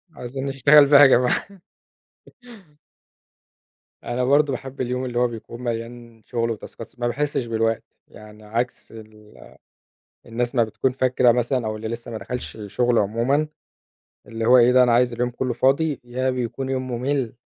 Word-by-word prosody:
عايزين 130 Hz, +2 st, -6 dB
نشتغل 140 Hz, +2 st, +5 dB
بقى 140 Hz, 0 st, +7 dB
يا -, -, +10 dB
جماعة. 125 Hz, -1 st, +2 dB, 2.6 s
أنا 120 Hz, +1 st, -2 dB
برضو 140 Hz, +3 st, +3 dB
باحب 135 Hz, +1 st, -6 dB
اليوم 125 Hz, +1 st, -2 dB
اللي 120 Hz, -1 st, -2 dB
هو 125 Hz, -, +3 dB
بيكون 115 Hz, +1 st, -9 dB
مليان 115 Hz, -1 st, -6 dB
شغل 115 Hz, -1 st, -2 dB
وتاسكات، 115 Hz, +1 st, -8 dB
س -, -, -24 dB
ما 120 Hz, -, 0 dB
باحسش 145 Hz, 0 st, -2 dB
بالوقت. 115 Hz, -1 st, -1 dB, 0.2 s
يعني 105 Hz, 0 st, -15 dB
عكس 115 Hz, +4 st, -4 dB
ال 110 Hz, -1 st, -15 dB, 0.9 s
الناس 120 Hz, +2 st, -3 dB
ما 120 Hz, -3 st, +3 dB
بتكون 110 Hz, +4 st, -1 dB
فاكرة 125 Hz, -1 st, +3 dB
مثلًا، 120 Hz, 0 st, -1 dB
أو 110 Hz, 0 st, -3 dB
اللي 110 Hz, +1 st, -6 dB
لسه 115 Hz, +1 st, -7 dB
ما 110 Hz, -, -5 dB
دخلش 125 Hz, +5 st, -6 dB
الشغل 115 Hz, +3 st, 0 dB
عمومًا، 120 Hz, +9 st, 0 dB, 0.8 s
اللي 115 Hz, 0 st, -4 dB
هو 125 Hz, +2 st, +6 dB
إيه 120 Hz, 0 st, +5 dB
ده 130 Hz, 0 st, +6 dB
أنا 125 Hz, -, +2 dB
عايز 120 Hz, 0 st, +3 dB
اليوم 120 Hz, +1 st, -1 dB
كله 125 Hz, +1 st, -3 dB
فاضي، 140 Hz, +3 st, +1 dB
يا 125 Hz, +2 st, -2 dB
بيكون 130 Hz, +1 st, -3 dB
يوم 130 Hz, -1 st, -2 dB
ممل، 125 Hz, 0 st, -2 dB
120 Hz, 160 wpm, -22 LUFS, 115-130 Hz, 2.6 s, يا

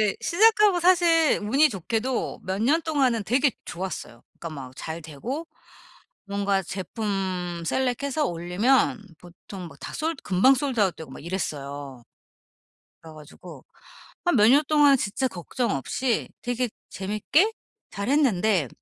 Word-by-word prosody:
이제 210 Hz, -2 st, +1 dB
시작하고 420 Hz, -1 st, +4 dB
사실 340 Hz, -3 st, +4 dB
운이 275 Hz, +9 st, +4 dB
좋게도 230 Hz, -, -2 dB
몇 190 Hz, +3 st, -2 dB
년 305 Hz, +7 st, +3 dB
동안은 260 Hz, -8 st, +1 dB
되게 255 Hz, +5 st, +2 dB
좋았어요. 170 Hz, -10 st, -6 dB, 0.2 s
그러니까 165 Hz, -, -6 dB, 0.2 s
막 -, -, -17 dB
잘 160 Hz, +1 st, -6 dB
되고 235 Hz, -, -6 dB, 0.8 s
뭔가 200 Hz, -1 st, 0 dB
제품 185 Hz, -3 st, -3 dB
셀렉해서 265 Hz, -, 0 dB
올리면 210 Hz, +8 st, +1 dB, 0.2 s
보통 180 Hz, +1 st, -11 dB
막 -, -, -16 dB
다 -, -, -7 dB
솔 320 Hz, +2 st, -1 dB
금방 200 Hz, +9 st, +4 dB
솔드 265 Hz, -2 st, -2 dB
아웃 190 Hz, -4 st, +2 dB
되고 160 Hz, -4 st, -10 dB
막 135 Hz, -, -11 dB
이랬어요. 140 Hz, -7 st, -5 dB, 1.0 s
그래 160 Hz, -1 st, -12 dB
가지고 150 Hz, -1 st, -13 dB, 0.6 s
한 350 Hz, -, +3 dB
몇 210 Hz, 0 st, +6 dB
년 280 Hz, +5 st, +6 dB
동안 295 Hz, -2 st, +5 dB
진짜 230 Hz, +5 st, -1 dB
걱정 235 Hz, +4 st, -3 dB
없이 220 Hz, -, -1 dB
되게 245 Hz, 0 st, -1 dB, 0.2 s
재밌게 215 Hz, -, +1 dB, 0.4 s
잘 200 Hz, +2 st, -4 dB
했는데 220 Hz, -, +2 dB
215 Hz, 275 characters per minute, -25 LUFS, 180-275 Hz, 1.0 s, 몇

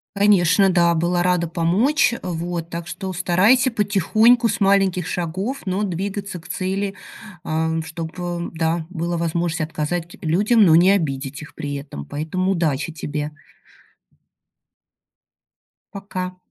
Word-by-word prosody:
Конечно, 195 Hz, -1 st, +4 dB
да. 170 Hz, -1 st, +3 dB
Была 175 Hz, +2 st, +1 dB
рада 180 Hz, -1 st, +1 dB
помочь, 190 Hz, -, +2 dB
а, -, -, -7 dB
вот. 170 Hz, 0 st, -4 dB
Так 170 Hz, 0 st, -6 dB
что, 190 Hz, +2 st, -5 dB
у -, -, -4 dB
старайся 200 Hz, +9 st, +3 dB
потихоньку 220 Hz, +3 st, +3 dB
с -, -, -2 dB
маленьких 195 Hz, -3 st, +2 dB
шагов, 185 Hz, +10 st, -3 dB
но 190 Hz, +2 st, -1 dB
двигаться 195 Hz, 0 st, -4 dB
к 165 Hz, -, -15 dB
цели, 195 Hz, +2 st, -2 dB, 0.5 s
ам, 160 Hz, +1 st, -1 dB
чтобы, 170 Hz, +2 st, -5 dB
да, 160 Hz, 0 st, -1 dB
была 170 Hz, -1 st, -3 dB
возможность 170 Hz, 0 st, -1 dB
отказать 165 Hz, +2 st, -3 dB
людям, 205 Hz, +8 st, +3 dB
но 160 Hz, -3 st, +6 dB
не 180 Hz, +3 st, +6 dB
обидеть 140 Hz, -7 st, -1 dB
их 155 Hz, -, -11 dB
при 145 Hz, -1 st, -5 dB
этом, 140 Hz, -, -7 dB
поэтому 160 Hz, -, -2 dB
удачи 165 Hz, -4 st, 0 dB
тебе! 150 Hz, -1 st, -4 dB, 2.6 s
Пока! 185 Hz, -2 st, -5 dB
175 Hz, 130 wpm, -21 LUFS, 160-195 Hz, 2.6 s, но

